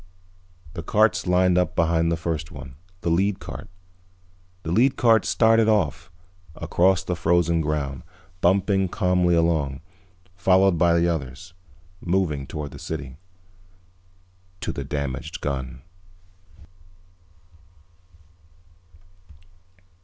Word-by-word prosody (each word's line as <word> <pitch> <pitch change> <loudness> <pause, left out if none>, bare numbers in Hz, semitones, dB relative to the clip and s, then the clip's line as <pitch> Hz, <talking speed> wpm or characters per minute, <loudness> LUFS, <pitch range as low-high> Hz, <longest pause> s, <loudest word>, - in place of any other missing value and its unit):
The - - -5
carts 90 +1 +2
lined 90 0 +3
up 90 0 -1
behind 85 0 +2
the 85 - 0
first 80 -2 -4
one, 65 -2 -10 0.3
the 85 - -1
lead 95 +3 +1
cart. - - -9 0.9
The 80 - -4
lead 125 +8 +3
cart 115 -3 +4
started 115 -1 +3
off, 100 -10 0 0.5
across 95 +1 +1
the 90 - -2
frozen 85 0 +2
ground, 75 -4 -2 0.4
bumping 95 +1 +2
calmly 90 -2 +2
along, 80 -5 0 0.5
followed 95 0 +3
by 85 0 +4
the 85 - +2
others. 80 +2 -4 0.5
Moving 85 -7 -1
toward 75 -2 -6
the - - -11
city. 70 -4 -6 1.4
To - - -2
the 70 - -5
damaged 70 +2 -4
gun. 65 -2 -4
85 Hz, 105 wpm, -23 LUFS, 75-95 Hz, 1.4 s, cart